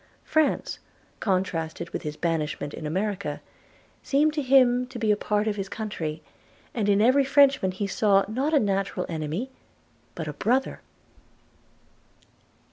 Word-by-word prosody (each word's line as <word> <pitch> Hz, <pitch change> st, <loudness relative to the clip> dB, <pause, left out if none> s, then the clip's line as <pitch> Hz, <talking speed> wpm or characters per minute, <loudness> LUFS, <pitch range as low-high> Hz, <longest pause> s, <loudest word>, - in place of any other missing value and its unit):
France, 315 Hz, -1 st, 0 dB, 0.4 s
contrasted 175 Hz, -4 st, -2 dB
with -, -, -4 dB
his 150 Hz, -1 st, -5 dB
banishment 155 Hz, -3 st, -2 dB
in 155 Hz, -, -5 dB
America, 190 Hz, -2 st, -2 dB, 0.6 s
seemed 300 Hz, +2 st, +2 dB
to 305 Hz, -, -1 dB
him 255 Hz, -2 st, +4 dB
to 255 Hz, -1 st, -9 dB
be 220 Hz, -2 st, +1 dB
a -, -, +4 dB
part 210 Hz, 0 st, 0 dB
of 210 Hz, -1 st, -1 dB
his 195 Hz, -1 st, -4 dB
country, 165 Hz, -8 st, -4 dB, 0.5 s
and 210 Hz, -4 st, 0 dB
in 200 Hz, 0 st, +4 dB
every 260 Hz, +4 st, +5 dB
Frenchman 270 Hz, -6 st, +4 dB
he 190 Hz, +2 st, -3 dB
saw, 195 Hz, 0 st, +3 dB
not 260 Hz, +8 st, -1 dB
a 300 Hz, -, +5 dB
natural 195 Hz, -3 st, -1 dB
enemy, 165 Hz, -, -3 dB, 0.6 s
but 160 Hz, -2 st, -5 dB
a 150 Hz, -, -4 dB
brother. 250 Hz, -, 0 dB
205 Hz, 140 wpm, -26 LUFS, 170-255 Hz, 0.6 s, every